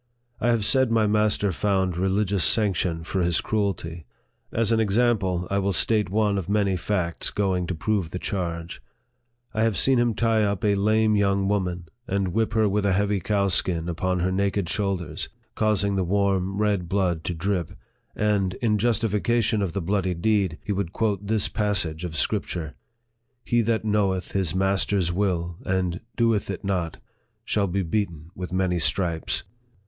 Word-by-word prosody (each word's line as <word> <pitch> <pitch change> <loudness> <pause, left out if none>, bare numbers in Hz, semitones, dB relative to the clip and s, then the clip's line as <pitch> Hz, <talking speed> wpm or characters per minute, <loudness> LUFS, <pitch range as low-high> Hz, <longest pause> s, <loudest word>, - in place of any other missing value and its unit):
I - - 0
have 115 -3 +2
said 130 0 +4
my 110 -1 +3
master 105 -1 +2
found 95 -1 0
religious 95 +1 +1
sanction 90 -6 +2
for 95 +3 -2
his 85 -1 +2
cruelty. 85 - -2 0.4
As 115 -1 +1
an 115 - +3
example, 100 -5 +1
I 100 - +2
will 100 0 0
state 105 +2 +2
one 105 0 +1
of 95 - -6
many 100 -2 +2
facts 90 -2 -1
going 95 -3 -1
to 90 - -2
prove 95 0 -1
the 90 - -5
charge. 85 -3 -4 0.7
I 110 - 0
have 110 -3 +2
seen 135 -2 +4
him 120 -2 +1
tie 115 -1 +2
up 100 -1 -1
a 105 - +4
lame 110 +2 +2
young 100 -1 +2
woman, 90 -4 -1 0.2
and 95 -1 0
whip 110 +4 0
her 110 -1 +3
with 100 +1 0
a 100 -2 +2
heavy 100 +1 +1
cowskin 95 -3 +1
upon 90 +1 -1
her 95 +1 +1
naked 100 -1 0
shoulders, 95 -5 -2 0.2
causing 100 -2 +1
the 95 - +1
warm 95 0 0
red 100 -5 0
blood 90 -4 0
to 90 - -2
drip; 90 0 -2 0.4
and, 100 -3 +1
in 105 -2 0
justification 115 0 +1
of 95 -4 -2
the 100 -2 -2
bloody 95 0 0
deed, 95 -2 +1
he - - -2
would 100 -3 -2
quote 105 -3 -1
this 110 -1 +1
passage 95 -7 -1
of 80 -3 -4
Scripture 80 -2 -1 0.4
" 120 +2 -49
He 120 0 +4
that 110 0 0
knoweth 100 -3 0
his* 95 -3 0
master's 95 -2 +1
will, 90 -3 -1
and 90 -2 -1
doeth 115 -4 +1
it 95 - -5
not, 90 -5 -1 0.5
shall 100 -2 +1
be 95 +2 -1
beaten 85 -3 -3
with 90 -1 -6
many 90 -1 0
stripes." 85 -1 0
100 Hz, 170 wpm, -25 LUFS, 90-105 Hz, 0.7 s, said